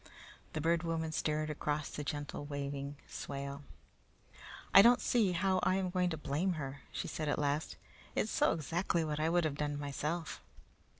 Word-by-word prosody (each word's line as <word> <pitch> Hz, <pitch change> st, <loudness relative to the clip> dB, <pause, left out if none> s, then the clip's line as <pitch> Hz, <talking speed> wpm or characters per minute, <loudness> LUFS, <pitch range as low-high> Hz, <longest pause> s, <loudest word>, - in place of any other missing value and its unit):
The 155 Hz, -, -2 dB
Bird 165 Hz, +1 st, +3 dB
Woman 165 Hz, -2 st, -1 dB
stared 155 Hz, 0 st, 0 dB
across 150 Hz, 0 st, -2 dB
the 150 Hz, -, -4 dB
gently 145 Hz, 0 st, -4 dB
waving 140 Hz, 0 st, -4 dB
swale. 140 Hz, 0 st, -5 dB, 1.1 s
"I 195 Hz, -, +12 dB
don't 240 Hz, +3 st, +7 dB
see 215 Hz, -7 st, +2 dB
how 185 Hz, +1 st, +2 dB
I 185 Hz, -, +3 dB
am 190 Hz, -1 st, 0 dB
going 180 Hz, -1 st, +2 dB
to 160 Hz, -, -3 dB
blame 155 Hz, +6 st, 0 dB
her," 140 Hz, -3 st, -5 dB
she -, -, -3 dB
said 155 Hz, -2 st, -2 dB
at -, -, +1 dB
last. 145 Hz, +1 st, 0 dB, 0.4 s
"It's -, -, +1 dB
so -, -, +3 dB
exactly 165 Hz, +1 st, 0 dB
what 150 Hz, -1 st, -2 dB
I 155 Hz, +1 st, +2 dB
would 175 Hz, +1 st, +3 dB
have 155 Hz, -, 0 dB
done 145 Hz, -1 st, -1 dB
myself." 150 Hz, -, -3 dB
155 Hz, 175 wpm, -34 LUFS, 145-170 Hz, 1.1 s, I